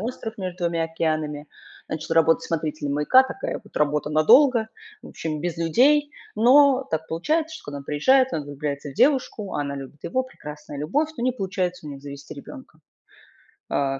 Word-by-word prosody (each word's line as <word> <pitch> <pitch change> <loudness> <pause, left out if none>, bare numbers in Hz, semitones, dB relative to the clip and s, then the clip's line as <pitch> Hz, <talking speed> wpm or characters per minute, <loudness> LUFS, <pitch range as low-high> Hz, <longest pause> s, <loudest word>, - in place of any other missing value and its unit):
остров 225 0 -5
между 185 -2 -4
2 170 -1 0
океанами. 155 -2 -2 0.4
Начал 160 +1 -3
работать 165 0 +4
смотрителем 155 -3 -2
маяка. 200 - +5
Такая 265 +9 -5
вот - - -19
работа 150 0 0
надолго. 220 - +5 0.3
В - - -11
общем, 155 -2 -4
без 175 0 -3
людей. 280 - +3 0.2
Но 265 +3 +5
так 160 0 -2
получается, 315 - -1
что - - -15
когда 145 0 -6
он 140 - -11
приезжает, 260 - +3
он 150 -2 -2
влюбляется 145 0 -5
в 135 - -13
девушку, 255 -7 +1
она 140 -1 -2
любит 140 +1 -9
его. 260 +9 0
Прекрасная 150 - -10
любовь. 275 - 0
Но 240 - -3
не 255 - +2
получается 185 -6 -3
у - - -6
них 140 -1 -9
завести 140 0 -9
ребёнка. - - -12 0.9
Э, 135 -1 0
165 Hz, 170 wpm, -24 LUFS, -, 0.9 s, маяка